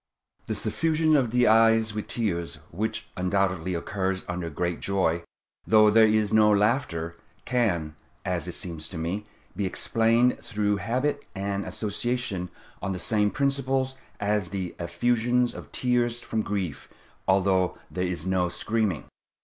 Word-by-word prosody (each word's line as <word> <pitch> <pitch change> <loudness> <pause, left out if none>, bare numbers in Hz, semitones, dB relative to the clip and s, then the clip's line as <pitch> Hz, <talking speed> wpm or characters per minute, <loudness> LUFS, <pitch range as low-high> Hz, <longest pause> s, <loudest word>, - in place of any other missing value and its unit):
The - - -1
suffusion 160 -1 +2
of 130 -5 +3
the 125 +2 +3
eyes 115 0 +5
with 105 0 -4
tears, 85 -8 -2 0.2
which 105 +7 -3
undoubtedly 90 -2 0
occurs 95 +2 -2
under 90 -2 -3
great 85 +3 -2
joy, 95 -4 +1 0.5
though 110 -1 +6
there 110 +1 +7
is 110 -1 +2
no 110 -1 +6
laughter, 100 -6 +1 0.3
can, 90 -12 0 0.3
as - - -1
it - - -4
seems 80 -3 -4
to 90 - -6
me, 90 +6 -3 0.3
be 100 - 0
explained 115 +5 +2
through 105 -3 -1
habit 130 +8 -1
and 100 +1 -2
association 105 -3 -2 0.3
on 95 - -2
the - - -3
same 105 +4 +1
principles 135 0 0 0.3
as 105 -3 0
the 95 -2 -4
effusion 120 +8 +1
of - - -10
tears 120 -1 +1
from 110 -2 -2
grief, 95 -8 -3 0.4
although 95 -1 +3
there 90 0 -1
is 85 -2 -3
no 95 -1 +1
screaming. 110 -4 -1
105 Hz, 140 wpm, -26 LUFS, 90-115 Hz, 0.5 s, there